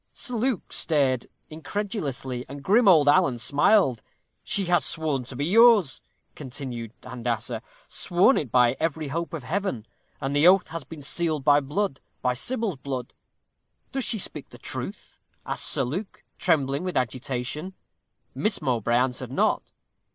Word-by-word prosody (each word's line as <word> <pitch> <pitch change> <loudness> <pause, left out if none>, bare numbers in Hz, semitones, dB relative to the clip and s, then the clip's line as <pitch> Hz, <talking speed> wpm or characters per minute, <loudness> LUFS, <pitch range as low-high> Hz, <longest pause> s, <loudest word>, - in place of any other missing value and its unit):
Sir 250 - -4
Luke 240 -2 -1
stared 135 -6 +1 0.2
incredulously, 155 - -4
and 140 0 -8
grim 215 +6 +4
old 160 -6 +6
Alan 130 -4 +4
smiled. 140 - +3 0.4
'She 200 - -1
has 175 0 +2
sworn 150 -6 -1
to 130 - -8
be 140 +3 -2
yours,' 210 - +5 0.3
continued 125 -5 -6
Handassah; 120 -2 -3 0.3
'sworn 180 +10 +3
it 130 -7 -2
by 125 0 +4
every 160 -2 -2
hope 165 +4 -3
of 160 -5 -6
heaven, 180 - -2 0.3
and 135 +1 -2
the 150 +4 +5
oath 190 0 +5
has 165 -2 -5
been 150 +2 -10
sealed 155 -1 +1
by 145 +1 +5
blood 145 +3 -2 0.2
by 125 -1 +2
Sybil's 220 - -1
blood.' 130 -2 -5 0.8
'Does 270 -1 -2
she 225 - 0
speak 155 -7 -2
the - - -13
truth?' - - -6 0.3
asked - - 0
Sir - - +4
Luke, 180 - -5 0.2
trembling 140 0 +1
with 180 -3 -2
agitation. 130 - -3 0.6
Miss 215 - 0
Mowbray 120 -4 0
answered 125 0 -1
not. 135 - 0
145 Hz, 150 wpm, -25 LUFS, 130-180 Hz, 0.8 s, old